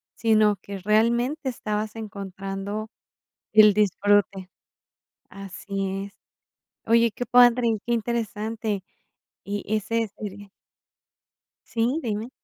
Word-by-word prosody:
sino, 215 -2 +3
que 200 -1 -7
realmente 235 - +1
estabas 215 -2 -3
encontrando 200 0 -5 0.6
el 215 -2 +7
disfrute 205 -2 +2 0.8
Así 195 0 -5
es. - - -23 0.7
Oye, 230 0 +4
qué 245 - -5
padre 245 0 +5
y - - +3
qué 240 - 0
interesante. 220 -2 -2 0.6
Y 205 0 -4
ese 225 +1 -1
sería 205 -1 -7 1.2
sí, 240 +6 0
dime. 220 +1 -3
215 Hz, 95 wpm, -25 LUFS, 200-230 Hz, 1.2 s, el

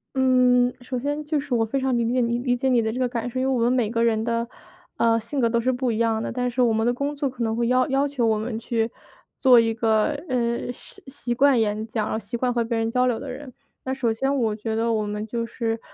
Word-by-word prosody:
嗯， 250 -1 +4
首 250 0 -4
先 290 +3 -2
就 300 0 -1
是 275 -2 -5
我 225 - +2
非 270 +5 -2
常 260 -2 0
理 235 0 0
解 255 - +1
你 235 -1 +1
理 245 0 0
解 265 - -1
你 245 -3 +3
的 220 0 -1
这 250 - -4
个 250 - +2
感 240 0 -3
受。 255 - -4
因 260 - 0
为 - - +2
我 245 - 0
们 240 - +3
每 245 -4 +1
个 230 0 0
人 220 -1 +1
的， 235 0 -1 0.5
呃， 230 0 +3
性 270 +5 -4
格 235 - +3
都 235 0 +1
是 255 +2 +1
不 250 0 -1
一 215 - -2
样 225 -1 +1
的， - - -3
但 250 0 -1
是 250 +1 0
我 235 -2 +3
们 220 +1 +1
的 245 - +2
工 280 +3 -3
作 280 -1 -1
可 245 -2 -5
能 225 0 0
会 235 0 0
要 255 0 +3
要 275 +1 +1
求 260 -4 -1
我 220 -1 +2
们 220 +1 -4
去 230 -1 -1 0.5
做 255 -3 +6
一 225 -1 +3
个， 220 -1 +2 0.2
呃， 235 -1 -1
习 400 - -16
习 265 -3 -4
惯 270 -2 +4
演 215 +1 -1
讲， 220 -2 -2
然 - - -3
后 220 - -1
习 235 - -7
惯 245 +1 0
和 235 -1 +1
别 230 0 -1
人 225 0 -1
交 250 +1 +2
流 235 -2 0
的 275 -2 -6
人。 260 0 -9 0.3
那 260 - -1
首 245 -4 0
先 270 +5 0
我 225 -5 +1
觉 220 +1 -4
得， 230 +1 0
我 215 -2 0
们 210 +1 -4
就 230 +1 -3
是， 225 -1 -3
240 Hz, 310 characters per minute, -24 LUFS, 225-255 Hz, 0.5 s, 做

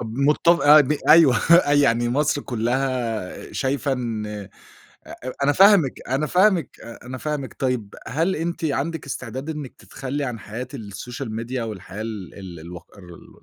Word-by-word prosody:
طب 115 - -4
مُتف 150 +6 +3
آه، 150 +1 +8
ب 145 +1 +1 0.2
أيوه. 150 -6 +7 0.4
يعني 120 -5 +3
مصر 145 +2 0
كُلّها 120 -4 -2
شايفة 140 +1 -1
إن 115 -4 -3
أ 105 -2 -7 1.0
أنا 145 - +4
فاهمِك، 195 -6 +5
أنا 135 +4 0
فاهمِك، 185 0 +2
أ 115 +1 -11
أنا 130 +1 -6
فاهمِك 150 -2 -4
طيب، 125 -6 -2
هل 165 +9 0
أنتِ 170 +1 -3
عندِك 155 +1 -2
استعداد 130 +3 -5
إنِّك 150 -4 -7
تتخلّي 140 +2 -5
عن 120 -3 -4
حياة 115 +5 -7
السوشيال 115 +2 -7
ميديا 120 +2 -3
والحياة 105 -2 -8
ال 105 -5 -7
ال 90 -5 -9
الوق 85 +2 -11
الر 90 -2 -12
ال - - -16
130 Hz, 155 wpm, -22 LUFS, 115-145 Hz, 1.0 s, آه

